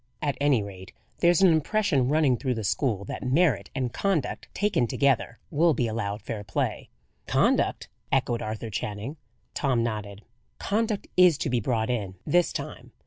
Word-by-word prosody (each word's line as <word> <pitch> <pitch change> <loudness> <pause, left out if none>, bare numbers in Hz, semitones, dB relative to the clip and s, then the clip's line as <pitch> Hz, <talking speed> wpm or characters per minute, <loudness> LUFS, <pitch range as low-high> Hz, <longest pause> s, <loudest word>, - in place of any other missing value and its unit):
At 145 -2 -1
any 140 -7 +3
rate, 95 -2 -10 0.3
there's 175 +1 +4
an 185 - +7
impression 160 -5 +1
running 150 -4 +3
through 130 0 -2
the 110 - -4
school 100 0 0
that - - -6
merit 130 - +2
and 125 -3 -2
conduct, 170 -11 -1
taken 200 - +1
together, 125 -2 +1
will 165 0 +3
be 120 - +1
allowed 105 -2 -3
fair 110 -2 -5
play." 100 - -2 0.4
"Conduct?" - - +2 0.2
echoed 125 -3 +1
Arthur 110 +1 -5
Channing. 105 +9 -4 0.4
Tom 130 -5 +1
nodded: 105 -2 -4 0.3
"Conduct 215 0 -1
is 180 -5 +6
to - - -2
be 125 - +2
brought 115 0 0
in, 100 -6 -3
this 175 0 +3
time. - - -7
125 Hz, 160 wpm, -26 LUFS, 110-155 Hz, 0.4 s, an